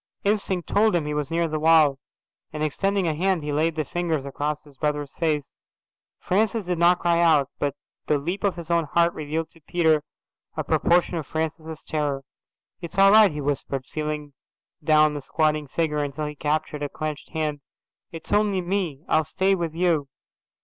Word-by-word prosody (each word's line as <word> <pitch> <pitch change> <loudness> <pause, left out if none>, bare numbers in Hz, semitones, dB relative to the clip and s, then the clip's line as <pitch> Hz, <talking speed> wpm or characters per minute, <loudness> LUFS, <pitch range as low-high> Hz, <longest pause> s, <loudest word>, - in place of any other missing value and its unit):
Instinct 200 -3 0
told 215 -1 +3
him 165 -4 0
he 150 - -2
was 150 -2 -2
near 170 0 +1
the 155 -1 -2
wall, 155 -3 +5 0.5
and, 150 0 -3
extending 195 +5 0
a 160 - +1
hand, 180 +1 0
he 150 0 -3
laid 160 +2 +1
the 155 -2 -1
fingers 165 -3 -2
across 145 +2 -3
his 145 -2 -18
brother's 150 0 -2
face. 155 -4 -1 0.6
Francis 215 +2 0
did 175 -1 -2
not 175 +1 +5
cry 170 -1 +2
out, 150 -5 +4
but 145 -1 -1 0.3
the 150 - +3
leap 175 +9 -4
of 200 -2 +1
his 170 -1 -7
own 170 -1 +2
heart 170 +3 +2
revealed 155 +2 -3
to 165 - -21
Peter 160 -1 +2 0.6
a - - -1
proportion 175 0 +2
of 155 - -5
Francis's 160 0 -4
terror. 145 -3 -2 0.6
"It's 170 +1 -7
all 195 0 +7
right," 215 -1 +7
he 150 0 -5
whispered, 135 -2 -2
feeling 150 -1 -3 0.5
down 155 0 +4
the 145 - -5
squatting 155 +1 0
figure 150 0 -1
until 145 +2 -4
he 150 - -4
captured 150 0 -2
a 145 - -2
clenched 155 -1 -5
hand. 155 -2 -2 0.5
"It's 165 -1 -6
only 205 -2 +2
me. 175 -5 -2
I'll 160 - +3
stay 190 +6 +1
with 170 -4 -2
you." 165 -5 +1
155 Hz, 185 wpm, -24 LUFS, 150-175 Hz, 0.6 s, all